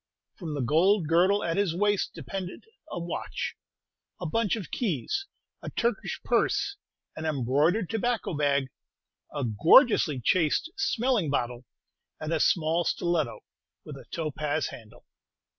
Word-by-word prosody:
From 160 -5 -6
the 140 - -2
gold 165 - +3
girdle 185 +5 +3
at 165 +1 -1
his 195 -5 +1
waist 205 +1 +1
depended 185 -2 -6 0.3
a - - -4
watch, 170 0 -4 0.7
a 180 - -5
bunch 215 +5 +1
of 210 -6 -7
keys, 210 - -2 0.3
a - - -5
Turkish 235 -3 -1
purse, 400 - +1 0.4
an 155 - -6
embroidered 155 - +1
tobacco 230 0 -1
bag, 140 -2 +1 0.6
a 145 -2 -3
gorgeously 150 - +5
chased 165 - +1
smelling 250 - +1
bottle, 125 -2 -2 0.5
and 155 +1 -3
a 160 - +1
small 165 +1 +2
stiletto, 165 -7 -1 0.4
with - - -8
a - - -12
topaz 150 -2 -2
handle. 110 -3 -13
170 Hz, 130 wpm, -28 LUFS, 145-205 Hz, 0.7 s, gorgeously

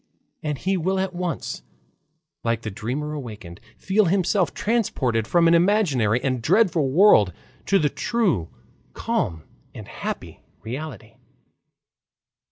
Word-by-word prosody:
and 150 -2 -3
he 190 +6 0
will 190 +3 0
at 190 -1 -2
once, 175 -1 -4 0.8
like 115 0 -1
the 110 - -4
dreamer 135 +10 -4
awakened, 110 - -8 0.2
feel 200 +2 +2
himself 185 +1 +1
transported 130 - 0
from 170 -1 +4
an 165 - +5
imaginary 170 - +3
and 130 -3 -1
dreadful 170 - +3
world 135 - +5 0.4
to 195 - +4
the 150 - +2
true, 170 - 0 0.4
calm, 80 -3 -2 0.3
and - - -9
happy - - -6 0.2
reality. 115 -2 -7
150 Hz, 120 wpm, -23 LUFS, 115-190 Hz, 0.8 s, an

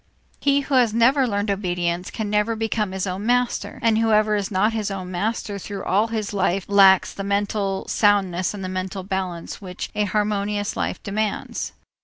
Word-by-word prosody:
He 280 0 +3
who 280 - -5
has 240 -4 +4
never 260 +3 +4
learned 205 -1 -1
obedience 180 -2 -1
can 220 -2 -4
never 210 +2 +1
become 220 -2 -1
his 190 0 -2
own 190 +1 -4
master, 245 0 0
and 225 -1 +3
whoever 215 -1 +3
is 205 -1 -1
not 205 +3 +2
his 215 -2 -1
own 185 -2 -5
master 205 +2 -2
through 200 0 -6
all 205 +4 +2
his 220 -3 -3
life 195 -1 0
lacks 195 -2 +5
the 195 - -5
mental 200 -1 -1
soundness 195 -3 +2
and 195 -2 -5
mental 185 +1 -4
balance 185 -3 -4
which 180 -2 -6
a 210 - +1
harmonious 205 0 -1
life - - -3
demands. 210 +1 -3
205 Hz, 175 wpm, -23 LUFS, 190-215 Hz, -, lacks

